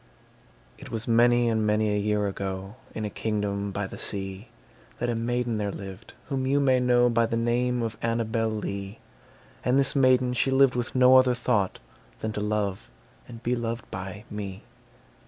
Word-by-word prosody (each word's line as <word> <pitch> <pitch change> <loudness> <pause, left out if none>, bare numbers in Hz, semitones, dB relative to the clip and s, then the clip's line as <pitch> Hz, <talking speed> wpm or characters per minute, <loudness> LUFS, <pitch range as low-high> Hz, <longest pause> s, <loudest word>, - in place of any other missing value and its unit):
It - - -10
was 110 -1 -4
many 120 +1 +4
and 110 -1 +1
many 105 0 +2
a 105 - +1
year 105 0 +1
ago, 95 0 -4 0.2
In 110 - -3
a - - -2
kingdom 100 -2 -2
by 100 +1 -2
the - - -8
sea, 95 +2 -4 0.5
That 120 0 -1
a - - 0
maiden 120 0 -1
there 100 -1 -1
lived 95 +3 -9
whom 130 -2 -1
you 140 +2 +3
may 130 -2 +3
know 125 -1 +4
By 115 -1 +2
the 115 - -1
name 120 +1 +1
of 115 -2 -4
Annabel 115 -1 0
Lee; 100 -1 -4 0.7
And 125 +2 +2
this 135 0 +2
maiden 130 -2 +4
she 125 +2 +1
lived 135 -1 +5
with 120 0 -3
no 130 0 +7
other 130 -1 +4
thought 115 -6 0 0.4
Than 110 - -3
to 105 - -4
love 105 -2 -2 0.4
and 115 0 -11
be 125 +1 +1
loved 115 -1 -4
by 95 +2 -6
me. 100 -2 -6
115 Hz, 180 wpm, -26 LUFS, 105-125 Hz, 0.7 s, no